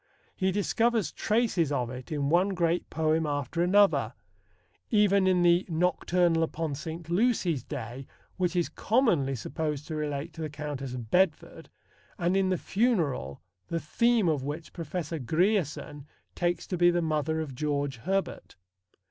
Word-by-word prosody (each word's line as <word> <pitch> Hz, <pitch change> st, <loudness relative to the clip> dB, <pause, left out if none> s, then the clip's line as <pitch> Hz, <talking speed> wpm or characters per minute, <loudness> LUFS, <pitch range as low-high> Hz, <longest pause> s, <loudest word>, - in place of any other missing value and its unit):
He 190 Hz, -1 st, +1 dB
discovers 225 Hz, +2 st, +1 dB
traces 210 Hz, -, +1 dB
of 125 Hz, -4 st, -1 dB
it 125 Hz, +2 st, -9 dB
in 145 Hz, -2 st, -1 dB
one 185 Hz, +3 st, +3 dB
great 170 Hz, -1 st, 0 dB
poem 160 Hz, 0 st, +1 dB
after 145 Hz, +3 st, -2 dB
another 200 Hz, +3 st, +3 dB, 0.7 s
even 200 Hz, -3 st, +4 dB
in 180 Hz, -1 st, +3 dB
the 175 Hz, +1 st, +5 dB
Nocturnal 175 Hz, 0 st, +2 dB
upon 160 Hz, -1 st, -2 dB
St. 160 Hz, +3 st, -6 dB
Lucy's 175 Hz, -, +1 dB
Day, 125 Hz, +2 st, -7 dB, 0.3 s
which 180 Hz, -1 st, -1 dB
is 175 Hz, -1 st, +2 dB
commonly 180 Hz, -, +1 dB
supposed 150 Hz, +3 st, -3 dB
to 160 Hz, -, -5 dB
relate 150 Hz, +1 st, -3 dB
to 165 Hz, -, -8 dB
the 155 Hz, -, -3 dB
Countess 140 Hz, -3 st, -5 dB
of 120 Hz, -3 st, -8 dB
Bedford, 180 Hz, -4 st, +1 dB, 0.5 s
and 175 Hz, +2 st, +1 dB
in 195 Hz, -1 st, +2 dB
The 185 Hz, -, +1 dB
Funeral, 165 Hz, -, 0 dB, 0.2 s
the 165 Hz, -, -2 dB
theme 230 Hz, +6 st, +2 dB
of 155 Hz, -4 st, +1 dB
which 150 Hz, +4 st, -6 dB
Professor 165 Hz, -1 st, -4 dB
Grierson 155 Hz, -, -1 dB, 0.3 s
takes 175 Hz, -1 st, -1 dB
to 180 Hz, -, -3 dB
be 175 Hz, 0 st, +6 dB
the 175 Hz, -1 st, +1 dB
mother 160 Hz, 0 st, 0 dB
of 155 Hz, -4 st, -4 dB
George 145 Hz, -1 st, -2 dB
Herbert. 190 Hz, +10 st, -3 dB
165 Hz, 150 wpm, -28 LUFS, 145-185 Hz, 0.7 s, be